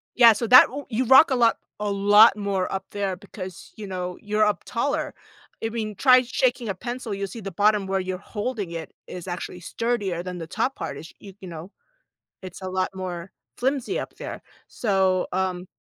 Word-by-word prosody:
Yeah, 235 -2 +8
so 230 +2 -3
that 250 +3 +9
u 285 +2 -7
you 255 +2 0
rock 265 +4 +7
a - - +3
lot 235 -2 +3 0.2
a 210 0 -1
lot 205 +2 +6
more 200 -3 -2
up 190 0 -3
there 200 -2 -2
because, 185 -2 -10
you 210 -2 -7
know, 180 -1 -4
you're 210 +1 +1
up 210 -1 +1
taller. 275 +4 -2 0.5
I 225 - 0
mean, 215 -2 -4
try 255 +3 +6
shaking 245 -2 0
a 195 - -2
pencil, 240 +2 -5
you'll 200 0 -3
see 210 +5 -9
the 195 -1 -6
bottom 205 +2 +2
where 190 0 0
you're 185 0 -3
holding 205 -1 -4
it 165 -2 -6 0.2
is 180 0 -8
actually 180 0 -5
sturdier 200 -3 -2
than 180 -1 -6
the 165 - -7
top 230 +9 -1
part - - -5
is, 160 - -11
y 200 -2 -11
you 190 - -8
know, 170 +2 -9 0.7
it's 185 -1 -9
a 185 - -4
lot 185 0 -1
more 180 -1 -6 0.3
flimsy 265 0 -1
up - - -7
there. - - -7 0.3
So, 190 -4 +1
um, 185 -1 -2
200 Hz, 200 wpm, -24 LUFS, 185-230 Hz, 0.7 s, that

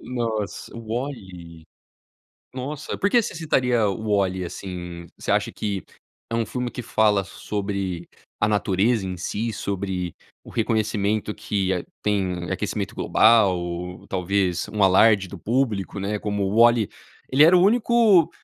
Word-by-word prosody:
Nossa, 115 -4 -4
WALL-E? 100 - -6 0.9
Nossa, 140 +3 -5
porque 215 +4 +3
você - - -5
citaria 125 -8 +1
o 95 - -4
WALL-E, 95 -2 +1
assim? 85 -1 -7
Você - - -3
acha - - +1
que 100 -3 -3 0.5
é - - 0
um 115 -1 0
filme 125 -1 -3
que 125 - -5
fala 105 -3 +2
sobre 95 -3 -4 0.3
a 105 - +3
natureza 105 +1 +1
em 90 -1 -4
si, 110 +6 -3
sobre 95 -3 -3 0.3
o - - -13
reconhecimento 105 -1 0
que 95 -3 -1
a 90 - -3 0.2
tem 95 -4 -1
aquecimento - - -3
global, 90 -5 +2
talvez 90 -1 0
um 105 -2 0
alarde 95 +1 +5
do 95 +1 -9
público, 110 -3 -1
né, 105 +2 -2
como 105 -1 -2
o 95 +2 -1
WALL-E 120 -2 +5 0.4
ele 140 +3 +6
era 170 +3 +7
o - - +4
único, 220 -5 +4
105 Hz, 140 wpm, -23 LUFS, 95-115 Hz, 0.9 s, era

